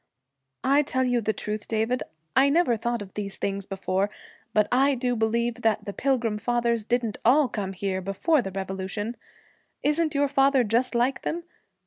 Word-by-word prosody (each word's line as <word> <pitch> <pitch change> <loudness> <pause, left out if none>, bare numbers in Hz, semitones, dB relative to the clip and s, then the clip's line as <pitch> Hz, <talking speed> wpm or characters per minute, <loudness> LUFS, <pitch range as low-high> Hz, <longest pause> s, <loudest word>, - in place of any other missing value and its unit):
'I 275 +3 +4
tell 260 -3 0
you 245 -2 +1
the 220 - +1
truth, 210 0 -4
David, 225 +3 0 0.3
I 270 +2 +5
never 310 -5 +3
thought 235 0 -2
of 195 - -14
these 200 -2 -4
things 200 -1 -3
before, 195 +1 -1 0.4
but 210 -1 +3
I 275 +2 +4
do 245 0 0
believe 235 +1 0
that 215 -2 +1
the 200 - -5
Pilgrim 235 -5 0
Fathers 235 0 0
didn't 235 -1 -1
all 275 +4 +5
come 200 -4 -4
here 190 0 -2
before 200 - +1
the 195 - -5
Revolution. 195 +4 -4 0.7
Isn't 305 +1 +1
your 285 0 +3
father 275 -1 +3
just 235 +3 +1
like 245 +3 +1
them? 340 +1 -3
235 Hz, 170 wpm, -26 LUFS, 205-260 Hz, 0.7 s, I